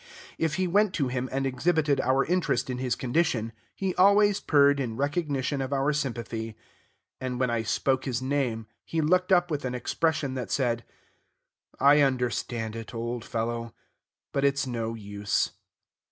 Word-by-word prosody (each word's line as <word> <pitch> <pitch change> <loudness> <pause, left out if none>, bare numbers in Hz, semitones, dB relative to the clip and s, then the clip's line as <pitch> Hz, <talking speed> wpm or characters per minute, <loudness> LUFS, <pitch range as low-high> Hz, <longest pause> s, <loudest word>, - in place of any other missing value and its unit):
If 160 -2 0
we 185 - +1
went 200 +2 +2
to 140 -6 0
him 130 0 -2
and 135 +1 -1
exhibited 145 +2 +1
our 135 +2 +2
interest 175 -6 0
in 125 - -4
his 125 -2 0
condition, 125 -4 0 0.2
he 190 -2 -1
always 200 +2 +5
purred 140 -1 +4
in 115 -4 -3
recognition 145 -1 -1
of 135 +1 -3
our 140 +2 +1
sympathy. 115 -5 -3 0.6
And 125 -1 -3
when 130 -2 +1
I 115 -1 0
spoke 130 +4 0
his 125 -3 -1
name, 130 -4 -1 0.2
he 165 - -3
looked 180 +4 +2
up 175 -2 +4
with 145 -1 -2
an 125 -1 -2
expression 150 +2 0
that 130 -2 -4
said, 120 -3 0 1.0
"I 145 +2 +6
understand 120 -4 -1
it, 115 0 -7
old 120 0 -3
fellow, 115 0 -3 0.6
but 140 - -1
it's 140 0 +2
no 115 -2 -3
use." 100 -1 -1
130 Hz, 160 wpm, -27 LUFS, 120-150 Hz, 1.0 s, I